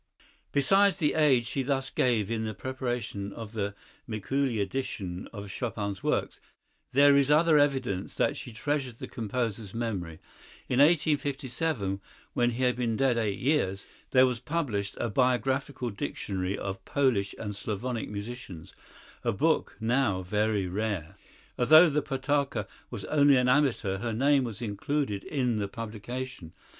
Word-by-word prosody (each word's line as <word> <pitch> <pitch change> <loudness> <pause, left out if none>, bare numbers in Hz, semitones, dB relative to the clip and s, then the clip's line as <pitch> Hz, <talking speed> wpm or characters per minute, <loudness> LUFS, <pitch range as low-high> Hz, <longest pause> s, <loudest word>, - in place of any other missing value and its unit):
Besides 195 +7 +4
the 150 -6 +2
aid 140 -6 +4
she 135 +4 -2
thus 135 0 -1
gave 115 -5 +1
in 110 -1 -1
the 110 -1 -4
preparation 120 -5 -3
of 110 -3 -8
the 100 -2 -3 0.3
Mikuli 120 +3 -1
edition 100 -4 -3
of 100 -3 -7
Chopin's 100 -3 -3
works, - - -1 0.5
there 140 +2 +6
is 140 -1 +4
other 155 0 +5
evidence 130 -10 0
that - - +1
she 135 -2 -8
treasured 130 +2 -2
the - - -7
composer's 115 -2 -3
memory. 95 -9 -3 0.5
In 125 - +1
1857, 140 - +1 0.3
when 120 0 +2
he 120 +2 -2
had 125 -1 +3
been 115 -3 0
dead 130 -3 +2
eight 105 -3 -1
years, 120 -9 0 0.2
there 130 0 +6
was 125 -2 -1
published 125 -8 -2
a 120 - -1
biographical 130 +2 0
dictionary 95 -1 -3
of 95 -1 -5
Polish 125 -9 +1
and 105 -2 -5
Slavonic 110 +4 -3
musicians, 105 -5 -7 0.5
a - - +2
book - - +1
now 110 -5 +1
very 105 +1 0
rare. 95 -3 -3 0.4
Although 155 +6 +7
the 150 +1 +1
Potocka 135 -5 -1 0.2
was - - -6
only 145 -2 +5
an 125 0 +3
amateur, 125 -8 +2
her 115 +1 -2
name 135 +3 +3
was 115 0 -6
included 105 0 -2
in 125 -6 0
the 100 -1 -1
publication. 115 -3 -6
120 Hz, 145 wpm, -28 LUFS, 105-135 Hz, 0.5 s, Although